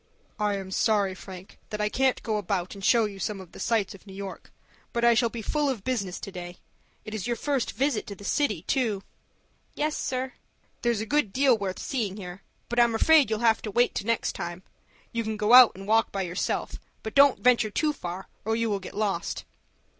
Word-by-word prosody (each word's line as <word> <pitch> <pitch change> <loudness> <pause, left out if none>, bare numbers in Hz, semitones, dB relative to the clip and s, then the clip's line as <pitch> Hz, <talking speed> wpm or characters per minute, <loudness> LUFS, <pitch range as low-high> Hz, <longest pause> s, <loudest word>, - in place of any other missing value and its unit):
"I 210 -1 +1
am 190 -1 -7
sorry, 205 -2 +2
Frank, 185 +1 -11
that 210 - -4
I 210 - +1
can't 260 +4 +1
go 220 -2 0
about, 190 -2 -2
and 195 - -10
show 230 +2 +4
you 200 -2 -6
some 200 +1 -3
of 185 -3 -11
the - - -12
sights 220 -5 0
of 195 +1 -16
New 190 - -10
York, 195 -1 -8 0.4
but 235 0 +1
I 235 - +7
shall 235 +1 +3
be 225 -1 -6
full 295 +2 0
of 235 -7 -3
business 200 -8 -2
to 195 - -6
day. 175 -1 -8 0.5
It 215 - -7
is 215 0 -3
your 240 - 0
first 275 -1 -1
visit 270 -4 0
to 200 - -6
the 200 - -13
city, 210 - 0
too." 220 -7 0 0.7
"Yes, 300 +1 0
sir." 260 -1 -3 0.5
"There's 235 -3 +1
a - - -3
good 290 -4 +1
deal 265 +2 +4
worth 195 -3 -3
seeing 215 -7 -2
here. 180 -1 -8 0.3
But 240 - -1
I'm 235 -1 +4
afraid 305 +3 +5
you'll 220 0 -1
have 225 -1 +4
to 215 - -5
wait 240 +4 +2
to 205 - -4
next 230 -1 +1
time. 175 +2 -6 0.5
You 230 0 -1
can 220 -1 -3
go 210 +2 +2
out 250 -2 +10
and 195 +1 -9
walk 225 +1 +3
by 195 -1 -2
yourself, 180 +1 -2 0.2
but 220 - -5
don't 280 -1 +6
venture 240 -3 +4
too 300 +8 0
far, 180 -7 -6 0.2
or 225 +1 0
you 230 -1 0
will 200 - 0
get 190 - -9
lost." 200 -5 -2
215 Hz, 220 wpm, -27 LUFS, 195-240 Hz, 0.7 s, out